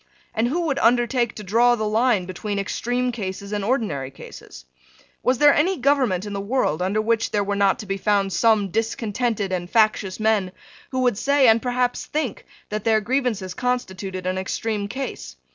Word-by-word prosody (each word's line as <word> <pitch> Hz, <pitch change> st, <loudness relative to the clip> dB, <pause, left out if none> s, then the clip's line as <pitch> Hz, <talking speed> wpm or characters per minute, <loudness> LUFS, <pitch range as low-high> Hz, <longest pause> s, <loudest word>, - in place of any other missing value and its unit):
And 225 Hz, +2 st, +1 dB
who 325 Hz, +8 st, -1 dB
would 290 Hz, -5 st, -1 dB
undertake 240 Hz, 0 st, +2 dB
to 210 Hz, -, -7 dB
draw 235 Hz, +5 st, +3 dB
the 215 Hz, -2 st, -2 dB
line 215 Hz, -3 st, +2 dB
between 200 Hz, +3 st, -4 dB
extreme 245 Hz, +5 st, -1 dB
cases 200 Hz, -3 st, -5 dB
and 205 Hz, -1 st, -2 dB
ordinary 200 Hz, -, -1 dB
cases? 65 Hz, -, -12 dB, 0.6 s
Was 255 Hz, 0 st, +2 dB
there 290 Hz, +1 st, +6 dB
any 365 Hz, +6 st, +2 dB
government 255 Hz, -9 st, +1 dB
in 205 Hz, -, -6 dB
the 200 Hz, -, -3 dB
world 200 Hz, -, 0 dB
under 190 Hz, +4 st, 0 dB
which 225 Hz, +1 st, +1 dB
there 205 Hz, -1 st, 0 dB
were 200 Hz, 0 st, -2 dB
not 200 Hz, -1 st, +3 dB
to -, -, -8 dB
be 195 Hz, 0 st, -2 dB
found 200 Hz, -1 st, +1 dB
some 220 Hz, -4 st, +3 dB
discontented 225 Hz, -1 st, -1 dB
and 175 Hz, -1 st, -3 dB
factious 215 Hz, -3 st, +2 dB
men 215 Hz, -4 st, +1 dB, 0.4 s
who 260 Hz, -1 st, -2 dB
would 245 Hz, -5 st, +1 dB
say, 280 Hz, -2 st, +3 dB
and 225 Hz, 0 st, +5 dB
perhaps 245 Hz, 0 st, -1 dB
think, 300 Hz, -7 st, -3 dB, 0.2 s
that 215 Hz, -1 st, -3 dB
their 220 Hz, -1 st, +3 dB
grievances 220 Hz, -5 st, -1 dB
constituted 190 Hz, -6 st, -3 dB
an 185 Hz, +1 st, -1 dB
extreme 205 Hz, +2 st, -2 dB
case? 205 Hz, -, -6 dB
215 Hz, 180 wpm, -23 LUFS, 195-245 Hz, 0.6 s, there